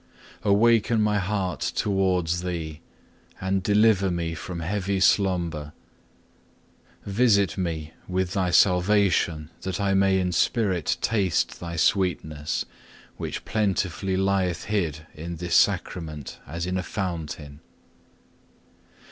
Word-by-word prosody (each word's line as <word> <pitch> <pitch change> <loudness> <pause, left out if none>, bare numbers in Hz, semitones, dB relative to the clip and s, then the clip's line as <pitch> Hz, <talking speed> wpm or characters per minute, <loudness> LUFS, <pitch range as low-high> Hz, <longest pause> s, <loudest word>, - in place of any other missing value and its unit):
Awaken 110 +2 +3
my 105 -1 +2
heart 95 -1 -2
towards 90 -4 0
Thee, 80 -3 -4 0.6
and 95 +1 0
deliver 105 -1 +3
me 85 -2 -2
from 85 +2 -6
heavy 100 +2 -1
slumber. 85 -7 +1 1.3
Visit 100 -1 +3
me 80 -4 -3
with 95 0 -1
Thy 95 -3 +1
salvation 90 -4 +3
that 95 -2 -3
I 100 -1 +1
may 95 0 +3
in 90 -1 0
spirit 95 - +1
taste 100 -6 0
Thy 85 -1 -6
sweetness, 85 - 0 0.5
which - - -5
plentifully 95 -3 0
lieth 95 -2 +1
hid 80 -7 -2
in 85 +3 -6
this 85 +1 -4
Sacrament 80 -5 0
as 85 +4 -4
in 90 +1 -1
a - - -1
fountain. 80 -7 -5
90 Hz, 110 wpm, -25 LUFS, 85-100 Hz, 1.3 s, Awaken